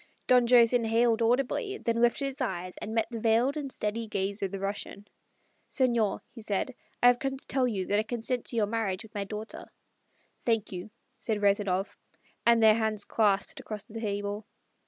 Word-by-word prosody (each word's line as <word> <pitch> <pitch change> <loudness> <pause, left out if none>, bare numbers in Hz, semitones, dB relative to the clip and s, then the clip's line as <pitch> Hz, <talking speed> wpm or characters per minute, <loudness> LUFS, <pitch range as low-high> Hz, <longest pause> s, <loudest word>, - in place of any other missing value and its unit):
Don 250 -1 +5
Jose 240 0 +6
inhaled 230 0 +2
audibly, 270 - +1
then 230 - -1
lifted 240 +4 +2
his 275 +1 -4
eyes 185 -6 -3
and 220 +1 -5
met 225 - +2
the 230 - -4
veiled 230 +5 +2
and 285 -3 -4
steady 220 +1 -3
gaze 200 0 -2
of 195 - 0
the 195 - -5
Russian. 200 +1 -5 0.6
"Senor," 235 -6 +1
he 230 - -10
said, 210 +5 -2 0.3
"I - - +7
have 245 0 +6
come 270 -1 -2
to - - -12
tell 260 -2 +1
you 195 -6 -2
that 205 +2 +2
I - - +3
consent 235 +2 -2
to - - -5
your 220 -2 +3
marriage 210 -2 -2
with 220 - -15
my 200 -2 -3
daughter." 210 +2 -7 0.7
"Thank 225 -3 0
you," 180 +2 -6 0.3
said 215 -2 -2
Rezanov. 200 -1 +1 0.5
And 235 -1 +5
their 220 -1 +8
hands 220 -2 -1
clasped 205 -3 +1
across 210 -2 -6
the 225 +1 -8
table. 205 0 -3
225 Hz, 190 wpm, -29 LUFS, 205-240 Hz, 0.7 s, their